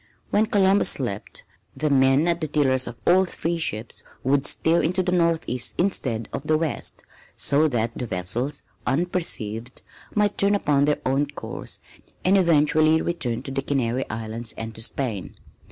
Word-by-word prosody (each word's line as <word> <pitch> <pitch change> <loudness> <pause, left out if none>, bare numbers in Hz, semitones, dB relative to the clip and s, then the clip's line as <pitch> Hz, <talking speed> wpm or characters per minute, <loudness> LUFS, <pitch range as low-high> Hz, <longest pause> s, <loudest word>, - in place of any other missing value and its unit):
When 215 +1 +3
Columbus 200 -2 +4
slept, - - -2 0.3
the 150 -1 0
men 135 +3 +4
at 170 0 +1
the 155 - -1
tillers 130 -4 +2
of 120 - -6
all 185 +2 +5
three 170 -2 -3
ships 110 -7 -3 0.2
would 135 +1 +2
steer 165 +1 +3
into 185 +3 0
the 180 - -1
northeast 165 -8 0
instead 125 - 0
of - - -3
the 155 - +3
west, 160 -2 -4 0.3
so 150 +3 +3
that 115 -4 -1
the 125 - -4
vessels, 110 +10 -2 0.2
unperceived, 130 - -2 0.3
might 210 -1 +1
turn 200 +1 +4
upon 145 -7 +2
their 150 0 0
own 135 +3 +1
course 145 - -7 0.5
and 190 +2 +5
eventually 155 -3 +4
return 125 -10 -2
to 135 - -7
the 135 0 -1
Canary 130 -2 -1
Islands 110 +1 -5
and 115 0 -5
to 110 - -5
Spain. 110 - -3
145 Hz, 160 wpm, -24 LUFS, 120-170 Hz, 0.5 s, all